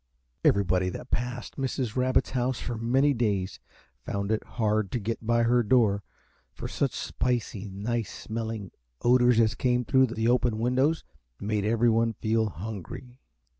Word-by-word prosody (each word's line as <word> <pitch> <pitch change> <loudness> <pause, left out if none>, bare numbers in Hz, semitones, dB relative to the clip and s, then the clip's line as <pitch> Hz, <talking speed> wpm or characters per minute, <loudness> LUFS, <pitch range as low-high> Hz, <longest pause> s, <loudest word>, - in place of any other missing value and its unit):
Everybody 90 -2 +3
that - - -8
passed 125 +1 -3
Mrs. 130 -4 -2
Rabbit's 130 0 +2
home 125 0 0
for 120 0 -4
many 130 +6 +2
days 100 - -1 0.4
found 100 +1 -2
it 110 - 0
hard 110 -3 -1
to 125 - 0
get 115 +2 -3
by 120 0 +3
her 120 +1 +4
door, 105 -3 +3 0.5
for - - -6
such - - -1
spicy, 115 -5 -2
nice 110 +4 -3
smelling 110 -3 -4 0.3
odors 120 -1 +5
as 110 -2 +4
came 125 -1 +1
through 130 +2 +4
the 115 -1 -1
open 120 -2 +2
windows 130 +7 +1 0.4
made 105 0 -1
everyone 115 +1 +2
feel 110 0 0
hungry. 110 - -8
115 Hz, 145 wpm, -27 LUFS, 105-125 Hz, 0.5 s, odors